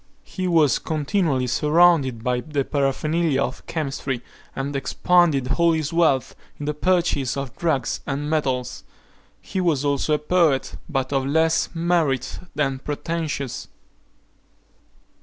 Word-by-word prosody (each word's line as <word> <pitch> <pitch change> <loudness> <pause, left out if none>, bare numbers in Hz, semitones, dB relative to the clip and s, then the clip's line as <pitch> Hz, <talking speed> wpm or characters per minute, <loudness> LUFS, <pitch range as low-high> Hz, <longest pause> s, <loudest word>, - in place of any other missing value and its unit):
He 185 -1 -4
was 160 -5 +3
continually 155 -3 0
surrounded 150 -2 +3
by 125 0 0
the 145 0 -2
paraphernalia 150 +1 0
of 130 - -5
chemistry, 135 -5 -3 0.3
and 140 +1 -3
expended 140 -2 +2
all 170 -1 +4
his 160 -1 -2
wealth 155 -7 +2 0.2
in 145 - -6
the 150 - -1
purchase 150 -6 +1
of 135 -4 -5
drugs 150 -8 -1
and 145 +1 -2
metals. 130 -5 -1 0.6
He 190 - -3
was 155 -6 +1
also 145 +2 +1
a - - +1
poet, 150 -3 +1
but 135 -2 -2
of 135 -1 0
less 160 +3 +2
merit 165 -6 0 0.2
than 135 -3 0
pretensions. 150 -2 -4
145 Hz, 125 wpm, -23 LUFS, 135-165 Hz, 0.6 s, all